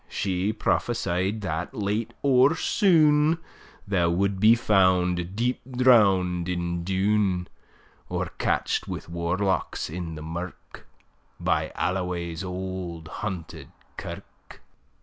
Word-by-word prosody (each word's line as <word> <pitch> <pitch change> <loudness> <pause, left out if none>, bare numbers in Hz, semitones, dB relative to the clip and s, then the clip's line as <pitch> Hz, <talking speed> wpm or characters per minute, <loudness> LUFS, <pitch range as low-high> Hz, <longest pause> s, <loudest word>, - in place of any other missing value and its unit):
She 95 +1 -1
prophesy'd 105 -3 -1
that 90 +5 -3
late 105 +1 -1
or 135 +2 +5
soon, 160 -5 +4 0.5
Thou 90 -4 +2
would 95 +3 0
be 110 +3 +7
found 95 -5 +2
deep 120 +3 0 0.2
drown'd 95 -8 +4
in 85 -1 -2
Doon; 95 -1 +1 0.6
Or - - -2
catch'd - - 0
wi' - - -4
warlocks 85 +1 -1
in 85 -1 -5
the 75 - -8
mirk, 85 +3 -8 0.5
By - - 0
Alloway's 90 -1 -2
auld 90 -3 -5
haunted 95 -6 -5 0.3
kirk. - - -10
95 Hz, 105 wpm, -26 LUFS, 90-105 Hz, 0.6 s, be